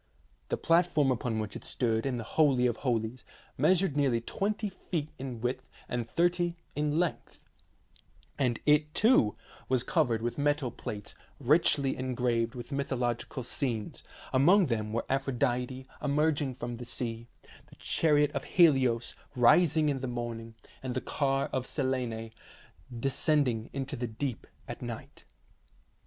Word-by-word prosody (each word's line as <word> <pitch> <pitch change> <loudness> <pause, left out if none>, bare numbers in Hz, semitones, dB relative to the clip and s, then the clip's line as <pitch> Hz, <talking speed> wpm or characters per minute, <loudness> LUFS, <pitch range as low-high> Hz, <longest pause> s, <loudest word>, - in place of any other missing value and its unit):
The - - 0
platform 165 -4 +3
upon 115 -2 -1
which 105 -3 -4
it - - -7
stood 115 0 0
in 130 -2 -1
the 115 - -4
holy 135 -1 +3
of 120 -2 +1
holies 120 -2 -1 0.3
measured 175 +2 +3
nearly 135 -5 +2
twenty 205 - -2
feet 165 -5 -4
in 130 -4 -6
width 125 +2 -3 0.2
and 120 -1 -3
thirty 175 0 +1 0.2
in 150 +1 0
length, 175 -1 -1 1.0
and 125 -4 +1
it, 150 0 +3
too, 215 - +4 0.3
was 130 -2 +2
covered 120 -6 +1
with 120 +4 -2
metal 145 -3 +1
plates 105 -2 -7 0.3
richly 140 0 +3
engraved 125 -2 -1
with 120 +2 -8
mythological 130 -2 -2
scenes; 115 -3 -3 0.3
among 175 +9 +6
them 110 -5 -2
were 115 - -1
Aphrodite 130 -1 -1 0.2
emerging 145 -2 +1
from 120 -1 -5
the 120 - -7
sea, 115 -1 -4 0.4
the - - -16
chariot 150 -2 +2
of - - -3
Helios 130 -9 +3 0.2
rising 155 +5 +5
in 140 -2 -1
the 130 - -3
morning, 115 -2 -5 0.3
and 130 -2 -4
the 130 - -1
car 135 -1 0
of 130 -1 -1
Selene 125 -5 -2 0.7
descending 135 -3 +1
into 135 +1 -4
the 120 -1 -3
deep 120 +2 -4 0.2
at - - -7
night. - - -8
130 Hz, 140 wpm, -30 LUFS, 120-150 Hz, 1.0 s, among